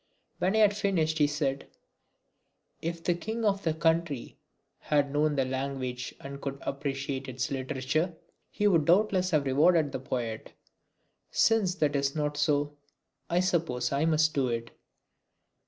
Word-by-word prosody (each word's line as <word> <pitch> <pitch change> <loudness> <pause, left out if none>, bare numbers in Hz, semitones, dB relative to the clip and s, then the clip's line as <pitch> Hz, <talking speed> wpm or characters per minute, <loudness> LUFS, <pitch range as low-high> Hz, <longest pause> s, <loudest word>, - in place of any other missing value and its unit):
When 190 +4 +1
I 220 -1 +7
had 205 0 +1
finished 165 -7 0
he 150 - +5
said: 145 -2 -2 1.1
"If 165 0 -4
the 175 - +2
king 220 +6 -4
of 200 -1 +2
the 160 -4 0
country 160 -4 0 0.4
had 145 -2 +1
known 150 0 +2
the 135 -2 +1
language 130 -1 -4
and 140 0 -8
could 140 0 -4
appreciate 135 -1 -3
its 130 +2 -3
literature, 140 +5 -1 0.3
he 205 - +1
would 165 -7 +3
doubtless 185 +1 +3
have 155 -5 +2
rewarded 150 +3 +3
the - - -3
poet. 120 -4 -4 0.8
Since 215 -5 +3
that 150 -5 +1
is 140 +1 0
not 150 -1 -1
so, 145 0 +1 0.5
I 175 +1 +2
suppose 160 -10 0
I 140 +3 +1
must 155 -1 +3
do 135 -2 +1
it." 115 -1 -3
150 Hz, 150 wpm, -29 LUFS, 135-170 Hz, 1.1 s, I